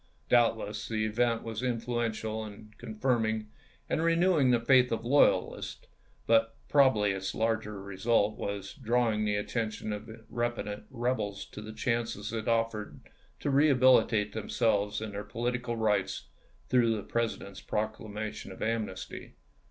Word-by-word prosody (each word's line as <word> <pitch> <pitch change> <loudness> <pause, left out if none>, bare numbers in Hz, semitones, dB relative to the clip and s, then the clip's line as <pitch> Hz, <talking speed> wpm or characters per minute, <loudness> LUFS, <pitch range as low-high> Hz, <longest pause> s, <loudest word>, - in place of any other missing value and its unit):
Doubtless 115 -3 +2
the 110 -1 -1
event 115 +1 +1
was 115 0 -4
influential 115 -3 -2
in 105 0 -11
confirming 110 -2 -1 0.4
and - - 0
renewing 165 -4 +3
the 120 -1 +4
faith 125 +1 +4
of 115 0 -2
loyalists; 140 +4 +2 0.4
but 115 0 +3
probably 130 -8 +4
its 95 0 -3
larger 110 -2 -1
result 100 +2 +1
was 100 -2 -4
in - - -15
drawing 115 -2 +2
the 105 -1 +1
atten 110 +2 -1
tion 110 0 -5
of 105 +2 -7 0.2
repentant 120 -3 -3
rebels 115 -6 -2
to - - -8
the 110 +1 -7
chances 115 -2 -2
it 110 0 -3
offered 115 -2 -1 0.4
to 145 - 0
rehabilitate 130 -7 +4
themselves 105 -2 0
in 110 -1 -4
their 100 +1 -5
political 120 +1 -2
rights 105 -4 0 0.4
through 120 -3 +3
the 105 - -4
President's 115 -4 -3
proclamation 110 -1 -4
of 95 - -6
amnesty. 110 -4 -4
110 Hz, 135 wpm, -30 LUFS, 105-120 Hz, 0.4 s, the